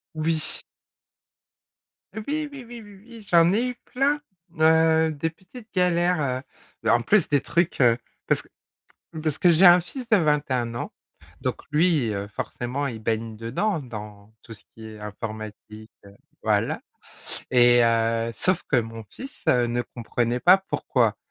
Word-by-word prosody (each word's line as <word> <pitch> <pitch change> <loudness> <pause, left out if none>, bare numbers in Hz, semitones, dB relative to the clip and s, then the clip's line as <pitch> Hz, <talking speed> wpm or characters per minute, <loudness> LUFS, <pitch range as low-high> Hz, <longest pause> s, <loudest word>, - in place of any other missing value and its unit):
Oui. 155 0 0 1.5
Oui, 220 -1 -7 0.3
oui, 275 -3 -9
oui, 240 0 -9
oui, 200 -2 -15
oui, 230 -2 -12
j'en 170 +1 +5
ai 245 +4 +1
eu 250 - -6
plein, 285 +3 0 0.4
heu, 160 0 +4
des 155 +3 -2
petites 205 +7 -15
galères, 175 -7 +1 0.4
heu, - - +1
en 120 +1 +4
plus 190 - +2
des 145 -2 +3
trucs, 170 +5 -1
heu, 120 -3 +5 0.3
parce - - +2
que - - -20 0.7
parce 155 -3 -1
que 180 - +4
j'ai 170 +4 +5
un 175 0 +9
fils 235 +8 -8
de 215 - +6
21 140 -8 0
ans, - - -5 0.5
donc - - -3
lui, 150 -7 +2
heu, 100 0 -4
forcément, 125 +7 -4
il 115 -4 -6
baigne 110 0 -2
dedans, 145 - -1
dans 105 -4 -10
tout 115 - -10
ce 105 - -14
qui 110 0 -11
est 110 -1 -10
informatique, 110 0 -8 0.6
voilà, - - +1 0.7
et 120 -1 +6
heu, 115 0 +1
sauf 185 +7 +2
que 145 - +4
mon 115 0 -8
fils 270 +2 -11
ne 120 -1 +2
comprenait 120 0 -2
pas 180 +6 +7
pourquoi 195 - 0
145 Hz, 150 wpm, -24 LUFS, 115-180 Hz, 1.5 s, un